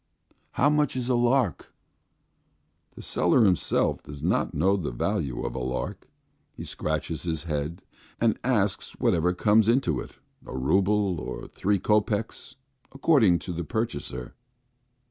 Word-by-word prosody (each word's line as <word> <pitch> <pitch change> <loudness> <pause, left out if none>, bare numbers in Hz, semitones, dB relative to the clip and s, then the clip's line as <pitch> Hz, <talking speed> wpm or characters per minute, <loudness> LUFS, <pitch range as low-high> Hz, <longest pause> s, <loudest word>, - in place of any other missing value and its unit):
"How 145 +3 +3
much 150 -3 +1
is 125 -1 -2
a - - +3
lark?" 120 +2 +1 1.2
The - - -10
seller 115 - +3
himself 90 -6 +1
does 70 -1 -10
not - - +1
know 95 +6 +3
the 90 -6 -2
value 60 +1 -2
of - - -3
a 65 - -4
lark. 65 +1 -4 0.5
He - - -7
scratches 80 +1 -3
his 80 -3 -2
head 80 +2 -3 0.4
and 115 -2 +2
asks 105 -6 0
whatever 85 +2 +2
comes 105 +3 +4
into 125 +4 +2
it, - - -9 0.3
a - - -7
rouble, 95 +6 +2
or - - -6
three 100 +1 0
kopecks, 105 +2 -1 0.4
according 135 - +4
to 90 - -4
the 85 +1 -3
purchaser. 70 - -4
95 Hz, 140 wpm, -26 LUFS, 80-115 Hz, 1.2 s, comes